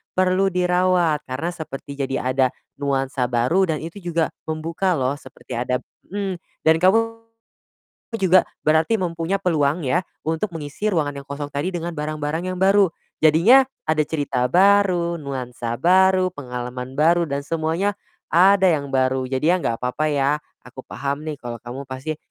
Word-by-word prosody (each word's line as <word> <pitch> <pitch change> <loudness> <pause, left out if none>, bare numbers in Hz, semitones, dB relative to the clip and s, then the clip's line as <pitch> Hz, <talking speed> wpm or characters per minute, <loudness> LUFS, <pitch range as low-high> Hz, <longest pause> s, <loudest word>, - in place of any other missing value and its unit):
perlu 185 +1 +3
dirawat. 180 -4 +1
Karena 140 +7 -3
seperti 140 -3 -8
jadi 135 -1 -1 0.2
ada 130 0 +3 0.3
nuansa 135 -2 -1
baru 130 +11 +2
dan 155 - -6
itu 170 +5 -7
juga 170 -3 -1 0.2
membuka 165 +3 -1
loh, 130 0 0
seperti 130 - -15
ada 125 +2 -1 0.2
mhm, 195 -2 -3 0.2
dan 160 0 +5
kamu 225 +4 +2 0.9
juga 185 -2 +5 0.2
berarti 160 +8 +3
mempunyai 175 +1 -1
peluang 155 -4 0
ya, 175 +8 +2 0.2
untuk 160 +6 -1
mengisi 150 +8 -3
ruangan 150 -6 0
yang 140 - -20
kosong 145 0 -5
tadi 145 +6 -1
dengan 175 -1 -4
barang-barang 155 +3 -3
yang 185 - -4
baru. 195 0 +4 0.3
Jadinya 170 - +6 0.2
ada 155 -1 +2
cerita 135 -5 -1
baru, 185 -1 +4
nuansa 125 -4 -4
baru, 185 +3 +4
pengalaman 125 -1 -6
baru, 170 +2 +3
dan 140 0 -2
semuanya 165 +6 0 0.4
ada 190 +2 +6
yang 140 -3 -1
baru. 130 -1 +1
Jadinya 160 +7 +1
nggak 115 -1 -1
papa 155 +5 0
ya, 145 +1 +1 0.3
aku 125 +1 -10
paham 140 +1 -3
nih 150 -2 -4
kalau 120 -2 -7
kamu 130 +3 -7
pasti 130 +4 -5
155 Hz, 150 wpm, -22 LUFS, 135-185 Hz, 0.9 s, Jadinya